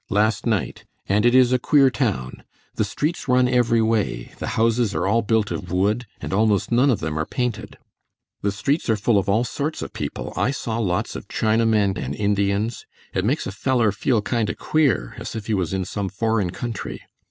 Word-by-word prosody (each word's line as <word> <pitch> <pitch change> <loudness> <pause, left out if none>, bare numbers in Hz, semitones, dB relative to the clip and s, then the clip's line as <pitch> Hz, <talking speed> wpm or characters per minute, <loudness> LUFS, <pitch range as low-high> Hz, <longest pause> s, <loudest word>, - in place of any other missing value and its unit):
last 105 +2 +1
night, 110 -5 -1 0.2
and 105 +4 +3
it 120 - +4
is 130 -1 +5
a 125 - +3
queer 135 0 +4
town. 100 - -2 0.3
The - - 0
streets 155 +1 -2
run 125 0 +4
every 120 -2 +3
way, 110 - -1
the - - -4
houses 115 -1 +2
are - - 0
all 110 +4 +3
built 110 -1 +1
of 90 - -5
wood, 105 +6 +1
and - - -5
almost 105 0 +2
none 125 +4 +4
of 120 - +1
them 80 -1 -2
are 80 - 0
painted. 125 -4 -3 0.6
The 100 - 0
streets 135 - -1
are 110 - +4
full 105 0 +2
of 100 +1 -3
all 110 +4 +3
sorts 145 +5 -3
of - - -8
people. - - -5
I - - +1
saw 115 -4 -3
lots 90 -6 -1
of - - -7
Chinamen 110 -3 +2
and 70 +3 -4
Indians. 100 +3 0 0.3
It 95 - 0
makes 130 +9 0
a - - -4
feller 115 +1 +1
feel 110 +2 0
kind 115 0 0
o' - - -3
queer 140 - +1
as - - -6
if 110 -2 -5
he 110 - -1
was 95 -5 0
in 95 -1 -1
some 100 0 -3
foreign 110 -1 0
country. 115 +4 -5
110 Hz, 205 wpm, -22 LUFS, 100-120 Hz, 0.6 s, is